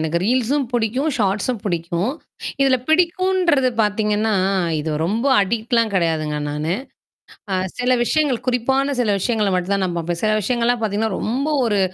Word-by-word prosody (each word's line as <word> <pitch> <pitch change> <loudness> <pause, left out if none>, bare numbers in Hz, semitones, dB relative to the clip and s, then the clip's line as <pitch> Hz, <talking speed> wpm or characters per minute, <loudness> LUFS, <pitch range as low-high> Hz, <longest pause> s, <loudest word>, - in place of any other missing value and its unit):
எனக்கு 160 +1 0
ரீல்ஸும் 255 +6 +1
பிடிக்கும். 240 +5 0
ஷார்ட்ஸும் 205 +2 0
பிடிக்கும். 175 +4 -1 0.5
இதுல 270 -1 +4
பிடிக்கும்ன்றது 350 -4 +2
பார்த்தீங்கன்னா, 210 +1 0 0.5
இது 155 +1 -3
ரொம்ப 220 +9 -1
அடிக்ட்லாம் 225 +2 0
கிடையாதுங்க 160 -4 0
நானு. 150 +3 -2 0.8
அ - - +2 0.2
சில 250 0 +2
விஷயங்கள் 285 -2 0
குறிப்பான 265 +3 +1
சில 220 -4 +2
விஷயங்கள 215 -2 0
மட்டும் 185 +2 0
தான் 195 -1 0
நான் 175 -1 -2
பாப்பேன். 170 +1 -3
சில 215 -1 +2
விஷயங்கள்லாம் 240 +2 0
பார்த்தீங்கன்னா, 215 -1 -1
ரொம்ப 265 +7 -1 0.2
ஒரு 210 -4 +1
220 Hz, 140 wpm, -20 LUFS, 190-255 Hz, 0.8 s, இதுல